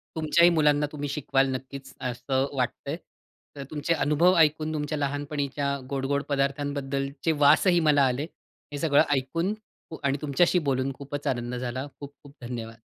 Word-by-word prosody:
तुमच्याही 160 +2 +4
मुलांना 150 -2 +3
तुम्ही 145 -1 -4
शिकवाल 135 -1 +1
नक्कीच 135 +1 -8
असं 130 +2 -1
वाटतंय. 140 +4 -2 0.6
तर 140 - -6
तुमचे 155 +2 0
अनुभव 160 +5 +3
ऐकून 155 0 +3
तुमच्या 150 0 -2
लहानपणीच्या 145 0 -2
गोड-गोड 140 +1 -1
पदार्थांबद्दलचे 140 +1 -1
वासही 175 +4 +5
मला 145 -2 +5
आले. 130 +3 -1 0.5
हे 145 - -4
सगळं 145 -2 +4
ऐकून 165 +9 -1 0.4
उ 160 - -6
आणि 140 +1 +1
तुमच्याशी 170 +5 +2
बोलून 130 0 0
खूपच 145 0 -6
आनंद 120 -1 -2
झाला. 130 +3 -4
खूप-खूप 145 0 -12
धन्यवाद. 115 -2 -6
140 Hz, 140 wpm, -26 LUFS, 135-150 Hz, 0.6 s, वासही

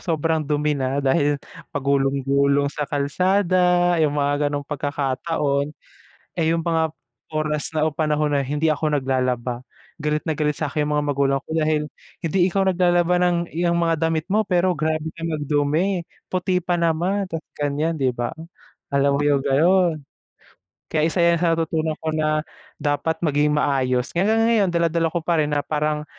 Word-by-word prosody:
sobrang 160 -2 0
dumi 150 +1 0
na 135 0 -1
dahil 145 +1 +2 0.4
pagulong-gulong 140 0 +1
sa 150 -1 -4
kalsada 180 +3 +2
yung 150 -2 +1
mga 145 0 +1
gano'ng 145 0 -3
pagkakataon. 145 0 -1 0.6
Eh, 160 -2 +1
yung 165 - -1
mga 160 -2 +1 0.4
oras 155 0 -1
na 155 0 +2
o 155 - -2
panahon 150 -1 0
na 140 - +2
hindi 150 +4 0
ako 150 0 -1
naglalaba, 125 -2 -1 0.4
galit 150 0 0
na 160 - 0
galit 150 -1 -1
sa'kin 150 -1 -1
yung 150 0 0
mga 145 - 0
magulang 135 0 +1
ko - - -15
dahil, 155 -1 +1 0.4
"Hindi 165 +3 -1
ikaw 195 +2 +1
naglalaba 175 -1 +2
ng 175 -1 +3 0.2
'yang 170 0 +1
mga 165 -1 +2
damit 160 +1 -1
mo 215 +2 +3
pero 180 -1 +2
grabe 155 +1 -1
ka 165 - -11
magdumi 155 +4 0 0.3
puti 185 0 0
pa 180 +1 0
naman 175 +5 0
tapos 165 -1 -5
gan'yan," 145 +3 0
diba, 125 -3 -1 0.6
alam 140 0 +2
mo 145 - +1
yung 140 -2 +2
gano'n. 165 +3 +3 0.9
Kaya 155 0 +2
isa 180 - -3 0.2
sa 165 -1 +3
natutunan 160 -1 -1
ko 160 - -1
na 155 0 +1 0.4
dapat 150 +2 -1
maging 150 -1 +2
maayos 130 -3 +1
kaya 175 - +2
hanggang 225 0 +3
ngayon 215 -5 +3
dala-dala 170 -1 +1
ko 170 - 0
parin 155 -4 +1
na 145 - 0
parang 150 0 -1
155 Hz, 160 wpm, -22 LUFS, 145-170 Hz, 0.9 s, ng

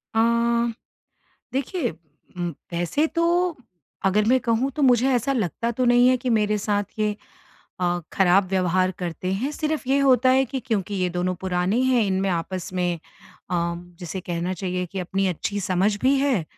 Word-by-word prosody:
अ, - - +3 1.3
देखिए 280 +7 -1
उम, 165 +2 -8 0.2
वैसे 175 - +1
तो 340 +1 +1 0.5
अगर 205 +2 +3
मैं 255 +4 +4
कहूँ 245 +2 +1
तो 300 - -1
मुझे 255 -1 +4
ऐसा 245 +3 +1
लगता 230 - -1
तो 250 +2 -1
नहीं 245 +1 +5
है 255 - +4
कि 250 0 -3
मेरे 210 -1 +2
साथ 205 0 0
ये 210 -1 0 0.6
अ, 175 0 +1
खराब 190 +1 +4
व्यवहार 185 -1 +1
करते 180 +1 -3
हैं 235 +9 -1
सिर्फ 305 -2 -2
ये 275 +1 +3
होता 260 -2 +4
है 265 +1 +4
कि 265 +1 -4
क्योंकि 205 -4 -2
ये 185 -2 0
दोनों 180 +1 -1
पुराने 185 +5 0
हैं 260 -2 +3
इनमें 190 0 0
आपस 180 +1 -3
में 180 -1 0 0.6
अ, 170 -1 0 0.2
जिसे 180 +1 -5
कहना 175 +1 -3
चाहिए 180 0 -3
कि 190 +3 -7
अपनी 195 +2 -1
अच्छी 200 +3 -2
समझ 190 +3 +1
भी 265 +2 +4
है। 265 - +1
205 Hz, 170 wpm, -24 LUFS, 180-255 Hz, 1.3 s, नहीं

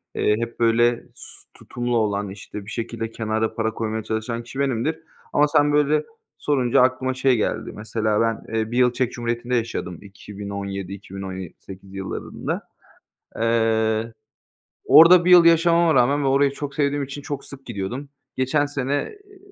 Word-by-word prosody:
eee, 105 - +2
hep 115 0 -5
böyle, 120 +1 +3
s - - -11 0.2
tutumlu 120 -1 -3
olan, 100 -2 0
işte 100 +1 -9
bir - - -10
şekilde 115 -1 -4
kenara 110 0 -2
para 110 -1 -1
koymaya 110 -1 -3
çalışan 115 +2 -3
kişi 135 +3 -9
benimdir 140 +4 0 0.3
ama 150 +1 +4
sen 145 -1 +3
böyle 150 +1 +3 0.3
sorunca 130 -5 +2
aklıma 130 0 +1
şey 130 0 +2
geldi, 110 - -2
mesela 110 0 -1
ben, 115 0 -2
eee, 110 0 -1
1 120 - -2
yıl 125 -1 +4
Çek 125 0 -1
Cumhuriyeti'nde 120 +1 -2
yaşadım 110 -7 -3
2017 100 -1 -7
iki 100 -1 -11
bin 95 - -5
on 95 -1 -5
ye 95 -3 -7
sekiz 95 0 -12
yıllarında. 95 -1 -5 0.8
Eee, 115 -1 +1 0.7
orada 170 +5 +8
1 180 - +2
yıl 175 -2 +9
yaşamama 170 0 +4
rağmen 140 +3 +3
ve - - +1
orayı 140 +1 +3
çok 140 0 -6
sevdiğim 145 0 0
için 140 +1 -8
çok 145 0 -5
sık 135 -1 -12
gidiyordum. 120 +6 -5 0.3
Geçen 140 +3 +1
sene, 140 -2 -3 0.3
eee, 405 -1 -19
120 Hz, 165 wpm, -22 LUFS, 110-140 Hz, 0.8 s, yıl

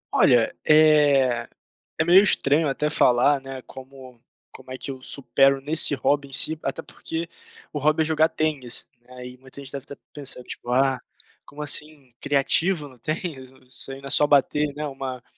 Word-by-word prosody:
Olha, 120 -3 +3
eh, 145 -6 +3 0.5
é 155 - +1
meio 180 +3 +6
estranho 155 -6 +4
até 150 +2 -2
falar, 140 -1 +2
né, 135 -1 -9
como 130 -2 -13 0.3
como 130 - -14
é 130 - -6
que 135 - -5
eu 130 -1 -10
supero 135 0 +1
nesse 150 +1 +3
hobby 140 +1 -1
em - - -17
si, 155 +3 +3
até 165 - -5
porque, 165 +1 -6 0.5
o 150 - -3
hobby 155 +2 +1
é - - -4
jogar 160 0 +2
tênis, 150 -6 -3
né, 120 - -24
aí 125 0 -10
muita 130 +1 -15
gente 135 -2 -7
deve 140 -1 -8
tá 140 - -9 0.2
pensando 140 -3 -5
tipo: - - -8
"Ah, 130 0 +1 0.5
como 150 +1 -8
assim 150 -2 -1
"criativo" 145 +4 +1
no 130 -3 -18
tênis, 155 -1 -5
isso 130 +1 -8
ai 135 0 -9
não 140 - -10
é - - -7
só 150 0 +6
bater, 150 +1 +1
né, 150 +1 -5
uma" 135 -3 -7
140 Hz, 185 wpm, -23 LUFS, 130-150 Hz, 0.5 s, meio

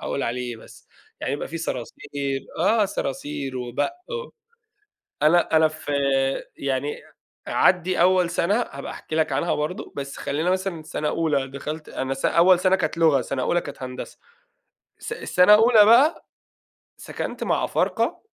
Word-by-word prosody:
أقول 140 - -3
عليه 125 +2 -2
إيه 120 - -6
بس، - - -16 0.3
يعني - - -2
يبقى 145 - -4
في 165 - -5
صراصير 140 -1 -4 0.2
آه، 215 +6 +3
صراصير 145 -6 -4
وبَق 125 - -2 0.2
و 485 0 -5 0.9
أنا 160 +1 +4
أنا 160 0 +5
فيعني 140 -1 -2 0.4
عدّي 180 0 +2
أول 180 0 +4
سنة 175 +3 +1 0.2
هابقى 140 0 -7
احكي - - -8
لك 160 -2 +1
عنها 170 +6 0
برضه، 150 +5 -4
بس 140 -1 -5
خلّينا 155 +5 -1
مثلًا 185 -3 -2
سَنة 150 -1 -3
أولى 150 -5 0
دخلت 150 +3 -6
أنا 135 0 -3
س 135 - -9
أول 175 +1 +5
سنة 190 0 +3
كانت 170 - -2
لغة، 160 -5 +4
سنة 130 +1 -3
أولى 175 +5 +1
كانت 145 -3 -9
هندسة 125 0 -7 0.8
س - - -7
سنة 180 +3 +4
أولى 220 0 +6
بقى، 245 +9 +4 0.7
سكنت - - -5
مع - - 0
أفارقة - - 0
155 Hz, 150 wpm, -23 LUFS, 135-180 Hz, 0.9 s, أولى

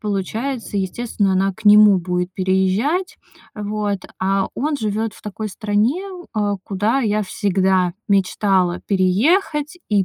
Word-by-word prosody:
получается, 215 +4 -3
естественно, 200 0 -1
она 195 +1 +1
к 220 +3 -16
нему 210 -1 +7
будет 180 0 -2
переезжать. 190 - 0 0.4
Вот, 210 -1 -2 0.2
а 195 +1 +1
он 295 +3 -1
живет 215 -2 -2
в - - -17
такой 215 +1 -5
стране, 215 - 0 0.3
а, 205 -1 0
куда 210 +6 0
я 215 -3 0
всегда 190 -3 +1
мечтала 190 -2 +1
переехать 295 - +1
и 205 -3 +2
205 Hz, 125 wpm, -20 LUFS, 190-220 Hz, 0.4 s, нему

